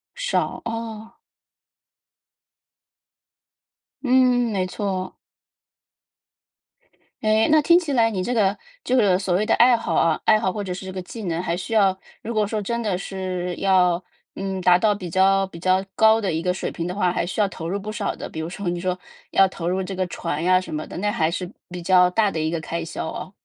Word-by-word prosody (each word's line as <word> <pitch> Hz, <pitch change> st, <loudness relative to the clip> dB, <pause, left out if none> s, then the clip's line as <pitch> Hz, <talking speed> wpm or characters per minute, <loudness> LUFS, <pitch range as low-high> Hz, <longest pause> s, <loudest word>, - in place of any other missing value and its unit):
少， -, -, -1 dB
哦。 225 Hz, 0 st, -6 dB, 2.9 s
嗯， 250 Hz, -2 st, +3 dB
没 190 Hz, -3 st, 0 dB
错。 185 Hz, -1 st, -3 dB, 2.1 s
诶， 215 Hz, 0 st, +3 dB
那 310 Hz, -1 st, +6 dB
听 340 Hz, +3 st, +5 dB
起 330 Hz, -5 st, -1 dB
来 230 Hz, -3 st, +4 dB
你 190 Hz, -4 st, -2 dB
这 245 Hz, -, -1 dB
个 205 Hz, -3 st, +2 dB, 0.3 s
就 255 Hz, -, +1 dB
是 190 Hz, -4 st, +3 dB
所 185 Hz, -3 st, 0 dB
谓 210 Hz, +3 st, +1 dB
的 225 Hz, -, +2 dB
爱 240 Hz, 0 st, +5 dB
好 -, -, -3 dB
啊， 165 Hz, -1 st, +2 dB
爱 215 Hz, 0 st, +5 dB
好 190 Hz, -, 0 dB
或 205 Hz, +2 st, -4 dB
者 185 Hz, -, -4 dB
是 190 Hz, +1 st, -7 dB
这 190 Hz, -, -5 dB
个 185 Hz, -, -5 dB
技 225 Hz, +5 st, -9 dB
能， 170 Hz, 0 st, -1 dB
还 170 Hz, -1 st, -1 dB
需 185 Hz, +5 st, -6 dB
要 200 Hz, -4 st, +4 dB, 0.3 s
如 235 Hz, -, -4 dB
果 210 Hz, -2 st, +1 dB
说 215 Hz, 0 st, -2 dB
真 235 Hz, +3 st, -2 dB
的 205 Hz, -5 st, -1 dB
是 185 Hz, -2 st, -4 dB
要， 180 Hz, -2 st, +3 dB, 0.3 s
嗯， 195 Hz, -1 st, -4 dB
达 180 Hz, 0 st, +5 dB
到 210 Hz, 0 st, +2 dB
比 185 Hz, -3 st, -7 dB
较 195 Hz, +3 st, +3 dB
比 180 Hz, -3 st, -11 dB
较 185 Hz, +2 st, +2 dB
高 220 Hz, 0 st, +5 dB
的 195 Hz, -6 st, -1 dB
一 160 Hz, -, -1 dB
个 180 Hz, -, 0 dB
水 180 Hz, -, -3 dB
平 170 Hz, -, -4 dB
的 180 Hz, -, -4 dB
话， 180 Hz, -3 st, +1 dB
还 -, -, 0 dB
需 175 Hz, +5 st, -4 dB
要 205 Hz, -, +4 dB
投 165 Hz, -3 st, -6 dB
入 200 Hz, -, -2 dB
不 210 Hz, +2 st, -6 dB
少 215 Hz, -2 st, -3 dB
的。 -, -, -7 dB
比 160 Hz, -, -8 dB
如 160 Hz, -, -4 dB
说 195 Hz, +1 st, -6 dB
你 175 Hz, -, -2 dB
说 185 Hz, 0 st, -2 dB, 0.3 s
要 195 Hz, -, +5 dB
投 170 Hz, -2 st, -4 dB
入 190 Hz, +1 st, -1 dB
这 190 Hz, +1 st, -5 dB
个 185 Hz, 0 st, -1 dB
船 155 Hz, -2 st, -4 dB
呀 185 Hz, +1 st, +4 dB
什 185 Hz, -, -8 dB
么 155 Hz, 0 st, -4 dB
的， -, -, -8 dB
那 205 Hz, +2 st, 0 dB
还 160 Hz, -4 st, +1 dB
是 180 Hz, +1 st, -3 dB, 0.2 s
比 180 Hz, -, -6 dB
较 180 Hz, -1 st, +5 dB
大 205 Hz, +2 st, +2 dB
的 160 Hz, -, -3 dB
一 155 Hz, -, 0 dB
个 165 Hz, 0 st, -2 dB
开 165 Hz, +1 st, -4 dB
销 165 Hz, -, -5 dB
哦。 185 Hz, -, -6 dB
190 Hz, 230 characters per minute, -23 LUFS, 180-215 Hz, 2.9 s, 那